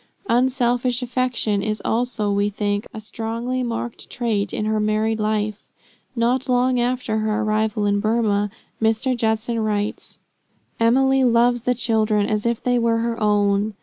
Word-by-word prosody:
Unselfish 245 0 +1
affection 245 -4 0
is 215 +1 -2
also, 225 -3 0
we 200 +1 +1
think, 205 0 -2
a 220 - -7
strongly 230 +3 -3
marked 235 -1 -4
trait 220 -4 -1
in 215 - -2
her 215 0 0
married 215 +1 0
life. 215 -1 -2 0.5
Not 245 +2 0
long 250 0 +2
after 240 -2 0
their 215 0 0
arrival 215 0 0
in 205 0 +2
Burmah, 215 -2 +1 0.3
Mr. 225 +4 +1
Judson 225 0 0
writes: 210 -1 -2 0.6
"Emily 265 +3 +3
loves 240 0 +3
the 250 +1 0
children 220 -3 +1
as 215 +2 -1
if 235 0 -1
they 245 -1 +2
were 230 -1 +2
her 230 0 -2
own." 205 0 +2
225 Hz, 150 wpm, -22 LUFS, 215-245 Hz, 0.6 s, Emily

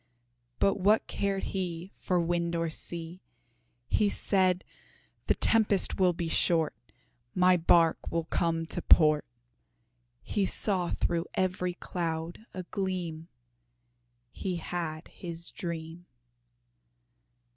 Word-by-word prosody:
But 195 0 +2
what 210 +4 +4
cared 200 -1 -2
he 180 -1 -3
For 180 -1 +1
wind 170 0 0
or 165 -1 -1
sea! 170 +2 -4 0.7
He 210 - +2
said, 185 -3 +1 0.6
"The - - +3
tempest 210 -4 +2
will 185 -1 +5
be 170 -1 -3
short, 165 -1 +2 0.6
My 180 0 +5
bark 165 -1 +3
will 165 0 0
come 165 0 0
to 175 - -3
port." 155 -3 +5 1.0
He 200 -3 0
saw 185 -4 +1
through 170 +1 -1
every 180 -1 0
cloud 170 +4 -4
a 185 - -6
gleam 180 -4 -3 1.0
He 185 +5 -3
had 165 -2 -4
his 170 -1 -6
dream. 170 0 -6
175 Hz, 110 wpm, -29 LUFS, 165-185 Hz, 1.0 s, will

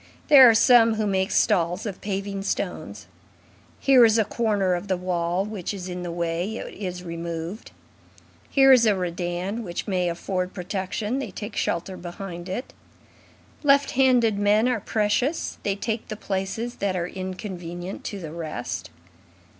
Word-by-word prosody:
There 265 -4 +10
are 225 - +4
some 230 -1 +6
who 215 -1 -1
make 190 -1 +1
stalls 175 +4 +1
of 200 -3 -5
paving 200 0 -3
stones. 195 - -4 0.7
Here 265 -3 +6
is 225 -1 +5
a 220 - +3
corner 205 -6 0
of 175 +3 -3
the 190 -2 0
wall 180 +1 -1
which 205 -2 -4
is 185 -2 -6
in 180 -1 -5
the 175 - -4
way, 170 +4 -2
it - - -7
is 180 -3 -5
removed; 170 +3 -5 0.8
here 270 -1 +6
is 240 -3 +6
a 210 - +4
redan 180 +4 -3
which 175 -4 -5
may 180 -3 0
afford 185 +2 -3
protection, 200 +6 -3
they 275 - -4
take 210 0 -7
shelter 180 +2 -2
behind 175 0 -7
it. 240 +8 -5 0.9
Left 280 -1 +4
handed 245 -5 +3
men 210 +3 +3
are 250 -3 +1
precious; 225 - -1
they 200 -1 -1
take 220 +2 -3
the 215 - -5
places 205 +5 -3
that 195 -2 -1
are 175 -1 -1
inconvenient 185 -1 -6
to 200 - -4
the 160 -4 -7
rest. 155 - -5
195 Hz, 160 wpm, -24 LUFS, 180-220 Hz, 0.9 s, There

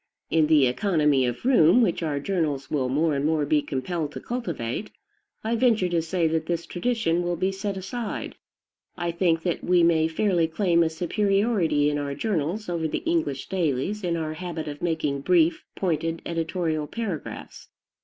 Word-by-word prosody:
In 160 -1 +4
the 150 -3 +5
economy 150 - +2
of 120 - -4
room, 240 -3 +5
which 180 -5 0
our 150 -3 -1
journals 150 -5 -2
will 130 -4 0
more 155 +4 +1
and 140 0 -1
more 155 -1 +1
be 150 +1 +2
compelled 150 +3 -3
to - - -5
cultivate, 180 - -4 0.5
I 225 +2 0
venture 225 -6 +3
to 170 -1 +1
say 165 +1 0
that 160 0 -1
this 170 -1 -2
tradition 175 -4 0
will 175 0 -1
be 185 +3 0
set 195 0 -4
aside. 220 +4 -5 0.6
I 175 -1 -1
think 170 -1 +1
that 175 -2 -2
we 180 -1 +4
may 160 -1 +4
fairly 170 0 +1
claim 170 0 +2
a 165 - +3
superiority 195 -2 +1
in 145 - -1
our 140 -1 -3
journals 200 +1 -2
over 170 -2 -1
the 160 - -3
English 330 - -1
dailies 185 +3 -1
in 170 -2 0
our 155 -1 -3
habit 165 -1 -5
of 145 0 -6
making 155 -5 -1
brief, 170 +1 +3
pointed 165 -2 -1
editorial 165 -2 -2
paragraphs. 200 -8 -6
165 Hz, 175 wpm, -25 LUFS, 155-190 Hz, 0.6 s, the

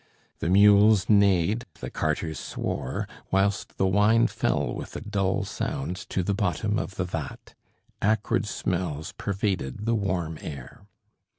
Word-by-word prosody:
The 85 - -1
mules 105 +1 +6
neighed, 100 +1 +3
the - - -6
carters 80 +1 -2
swore, 65 - -3 0.2
whilst 95 +1 0
the 95 - +2
wine 105 +4 +4
fell - - 0
with - - -7
a - - -4
dull 100 -1 0
sound 115 - -3
to 95 - 0
the 100 - 0
bottom 100 +2 0
of 95 - -5
the 90 - -1
vat. 80 -5 -6 0.5
Acrid 105 0 +1
smells 85 -6 -2
pervaded 100 -4 -2
the 115 - +2
warm 90 -7 -1
air. 70 -5 -9
95 Hz, 135 wpm, -26 LUFS, 85-105 Hz, 0.5 s, mules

